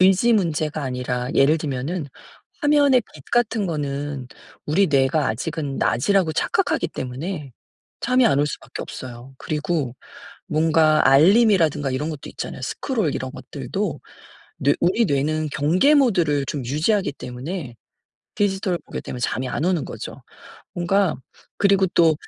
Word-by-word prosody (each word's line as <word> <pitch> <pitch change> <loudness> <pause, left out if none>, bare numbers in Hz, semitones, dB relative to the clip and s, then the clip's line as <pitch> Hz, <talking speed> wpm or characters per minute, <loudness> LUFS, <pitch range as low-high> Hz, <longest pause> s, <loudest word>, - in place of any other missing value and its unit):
의지 195 +6 +5
문제가 155 -5 0
아니라 125 -1 -3
예를 150 +4 +4
들면은 145 +3 -3 0.5
화면의 285 -4 +4
빛 140 - -13
같은 225 -4 +2
거는 145 -4 -3 0.4
우리 190 +7 +3
뇌가 140 +1 +2
아직은 140 +4 -3
낮이라고 180 +5 +2
착각하기 - - 0
때문에 140 +2 -5 0.5
잠이 255 0 +3
안 140 - +3
올 145 - +2
수밖에 150 - -7
없어요. 125 +1 -9
그리고 150 -4 -2 0.5
뭔가 155 -1 +3
알림이라든가 160 - +4
이런 150 +5 -2
것도 150 -3 -8
있잖아요. - - -6
스크롤 220 - -1
이런 130 0 -4
것들도 140 +6 -4 0.6
뇌 140 +1 +3
우리 195 +6 +3
뇌는 155 +2 0
경계 180 - +3
모드를 175 - +3
좀 140 -1 -4
유지하기 155 - +1
때문에 125 +1 -6 0.6
디지털을 195 -3 0
보게 - - -6
되면 125 - -7
잠이 125 +2 -1
안 140 +5 -2
오는 180 -5 +1
거죠. - - -8 0.5
뭔가 180 0 +1 0.4
그리고 195 -1 +4
또 165 -2 +5
155 Hz, 310 characters per minute, -22 LUFS, 135-190 Hz, 0.6 s, 의지